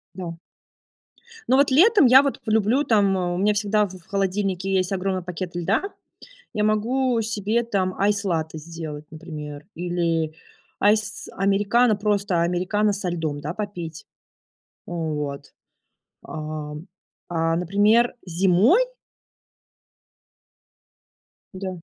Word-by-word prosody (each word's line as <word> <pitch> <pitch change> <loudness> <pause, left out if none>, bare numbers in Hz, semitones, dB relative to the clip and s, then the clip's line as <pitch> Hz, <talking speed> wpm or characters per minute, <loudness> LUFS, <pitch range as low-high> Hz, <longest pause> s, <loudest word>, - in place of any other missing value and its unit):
Да. 170 -3 -6 1.1
Ну 260 - +4
вот 280 -1 +4
летом 390 - +6
я 260 +2 +8
вот 280 - -2
люблю 220 +5 +2
там: 200 -5 +3
а, 175 -1 -1
у - - -3
меня 210 +2 +2
всегда 210 0 +1
в 190 - -9
в 165 - -22
холодильнике 195 -1 -1
есть 185 0 +1
огромный 190 -1 -1
пакет 180 0 -6
льда. 190 - 0 0.7
Я 210 - 0
могу 235 +3 +1
себе 215 +2 0
там 190 -5 -1
айс 200 0 +2
латте 160 -4 -2
сделать, 155 -2 -7
например, 150 -2 -8
или 170 -2 -1 0.5
айс 210 0 +1
американо- 205 +4 +2
просто 200 -4 0
американо 185 +5 +1
со 190 -2 -2
льдом, 160 -4 -3
да, 150 +3 -4
попить. 175 -7 -6 0.8
Вот. 150 -4 -4 0.7
Ам. 155 +1 -6 0.4
А 165 -1 0
например, 205 +7 +3
зимой 190 - +4 2.7
Да, 190 0 -5
190 Hz, 115 wpm, -23 LUFS, 170-210 Hz, 2.7 s, я